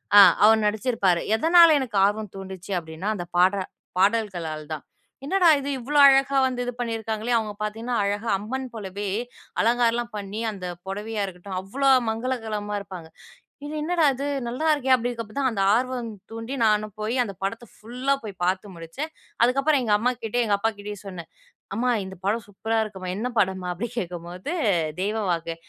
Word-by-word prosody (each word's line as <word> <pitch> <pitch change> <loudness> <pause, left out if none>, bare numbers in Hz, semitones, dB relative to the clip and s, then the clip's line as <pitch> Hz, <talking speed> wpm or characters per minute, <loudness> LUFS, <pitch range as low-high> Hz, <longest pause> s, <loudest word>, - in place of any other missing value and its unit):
அ - - +11 0.3
அவரு 220 +1 +6
நடிச்சிருப்பாரு. 210 -5 +1
எதனால 330 +5 +7
எனக்கு 240 -6 -3
ஆர்வம் 210 0 -1
தூண்டுச்சு 190 0 -8
அப்பிடீன்னா, 160 +4 -5
அந்த 175 -3 -5
பாடுற 190 +3 +4 0.4
பாடல்களால் 185 -7 0
தான். 155 - -6 0.4
என்னடா 365 +3 +3
இது? 280 0 -4
இவ்வளோ 285 +5 -2
அழகா 270 0 +4
வந்து 255 -1 -1
இது 245 - -2
பண்ணிருக்காங்களே? 225 0 -2
அவுங்க 215 -2 -2
பார்த்தீங்கன்னா, 225 +3 -3
அழகா 205 +3 -1
அம்மன் 260 +6 -4
போலவே 205 -2 -5 0.5
அலங்காரம்லாம் 235 0 +1
பண்ணி, 205 +1 -5
அந்த 190 -3 -7 0.2
புடவையா 210 +2 -3
இருக்கட்டும், 185 0 -6
அவ்வளோ 270 +9 0 0.2
மங்களகரமா 220 -3 -2
இருப்பாங்க. 180 -5 -9 0.6
இது 300 - -6
என்னடா 335 +1 +1
இது? 275 +3 -4 0.2
நல்லா 255 +7 -2
இருக்கே! 265 -3 +1
அப்பிடீங்கறப்ப 235 -3 -3
தான், 265 -2 +2
அந்த 195 -3 0
ஆர்வம் 250 -1 -2 0.2
தூண்டி, 225 +4 -5
நானும் 210 -1 +1
போய் 220 +4 -1
அந்த 200 - -7
படத்த 230 +4 -3
ஃபுல்லா 250 +5 -1
போய் 200 -4 -8
பார்த்து 185 +1 -1
முடிச்சேன். 170 - -6 0.3
அதுக்கப்புறம் 275 +4 +3
எங்க 220 -3 0
அம்மாகிட்டயும், 240 0 0
எங்க 205 -2 +3
அப்பா 225 +3 +1
கிட்டயும் 205 0 -7
சொன்னேன். 180 -4 -8 0.5
"அம்மா 250 +4 +1
இந்த 190 0 -9
படம் 215 +2 0
சூப்பரா 220 +3 -2
இருக்குமா. 190 -4 -7
என்ன 220 +4 -2
படமா?" 190 -2 +1
அப்பிடி 210 +7 -4
கேட்கும்போது, 180 - -5 0.5
"தெய்வ 210 +3 -1
வாக்கு, 165 -1 -2
215 Hz, 160 wpm, -25 LUFS, 195-245 Hz, 0.6 s, அ